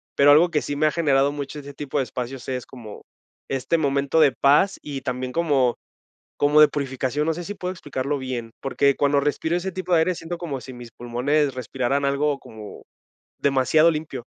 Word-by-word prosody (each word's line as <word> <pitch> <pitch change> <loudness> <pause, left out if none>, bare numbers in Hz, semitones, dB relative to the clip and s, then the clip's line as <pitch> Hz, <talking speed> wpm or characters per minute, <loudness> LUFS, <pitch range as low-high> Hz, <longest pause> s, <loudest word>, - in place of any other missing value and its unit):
pero 145 +1 +6
algo 165 +4 +6
que 150 -3 0
sí 145 - -4
me 155 - +2
ha 155 - +3
generado 145 -4 +2
mucho 145 +1 -6
ese 145 0 -10
tipo 145 0 -5
de 135 - +2
espacios, 125 +2 -6
es 130 -1 -3
como, 115 -5 -11 0.5
este 135 +5 0
momento 140 0 +1
de 145 -3 +6
paz 150 +8 +3
y 140 -2 -6
también 125 0 -4
como 140 -7 +2 0.6
como 145 +1 +3
de 150 - +9
purificación. 140 0 -2
No 160 - +1
sé, 175 +2 -6
si 205 - -5
puedo 180 -2 -4
explicarlo 145 -5 -3
bien, 125 -4 -5
porque 140 0 +1
cuando 140 0 +2
respiro 150 +3 -1
ese 185 +2 -2
tipo 185 -1 -3
de 165 - +5
aire 175 +2 +1
siento 165 +2 -6
como 150 -7 -5
si 130 +2 -10
mis 120 -1 -11
pulmones 130 +5 0
respiraran 130 +3 -2
algo 140 +1 0
como 110 -2 -11 0.6
demasiado 140 +4 +4
limpio. 150 -6 -5
140 Hz, 195 wpm, -23 LUFS, 130-155 Hz, 0.6 s, de